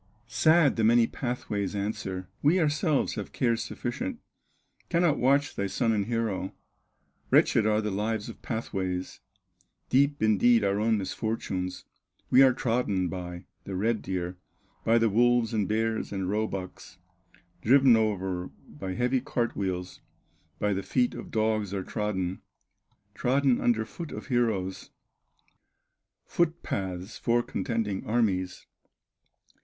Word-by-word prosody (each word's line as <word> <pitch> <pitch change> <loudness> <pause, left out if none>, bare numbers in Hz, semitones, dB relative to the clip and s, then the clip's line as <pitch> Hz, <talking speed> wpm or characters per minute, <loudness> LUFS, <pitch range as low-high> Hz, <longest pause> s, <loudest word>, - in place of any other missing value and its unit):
Sad, 140 +6 +4
the 110 - +1
many 115 +1 +5
pathways 105 -6 -3
answer: 100 -3 -3
"We 160 +6 +4
ourselves 150 -1 +1
have - - -5
cares 115 -3 +1
sufficient, 140 - -4 0.7
Cannot 170 -3 +2
watch 140 +3 +2
thy 100 - -1
son 115 +3 0
and 105 -2 0
hero, 115 -5 -2 0.7
Wretched 110 -2 +4
are 105 0 +2
the 105 -1 -2
lives 105 +2 -2
of 115 - -10
pathways, 95 -6 -3 0.7
Deep 140 0 +2
indeed 110 +2 +4
our 100 0 +1
own 110 +1 +2
misfortunes; 95 -3 -3 0.5
We 130 - +7
are 135 -1 +7
trodden 115 -7 0
by 90 -1 -6 0.2
the 95 - -5
red 110 +3 0
deer, 90 -1 -4 0.4
By 115 +1 +4
the 115 0 +3
wolves, 120 +1 +3
and 105 -3 +1
bears, 110 +1 -1
and 95 -2 -2
roebucks, 100 -2 -4 0.6
Driven 130 +2 +6
o'er 95 -5 -1 0.2
by 95 +5 -6
heavy 125 +4 +1
cart 120 -3 -2
wheels, 90 -2 -3 0.6
By 105 -1 +1
the 95 - -1
feet 125 +5 +1
of - - -8
dogs 110 -3 0
are 95 - -2
trodden, 95 -3 -2 0.7
Trodden 130 0 +2
under 110 -2 +2
foot 165 +8 -8
of - - -8
heroes, 110 -7 0 1.4
Foot 170 0 0
paths 95 +2 -4
for 120 +1 +2
contending 110 -7 -2
armies." 100 -6 0
110 Hz, 130 wpm, -28 LUFS, 95-120 Hz, 1.4 s, We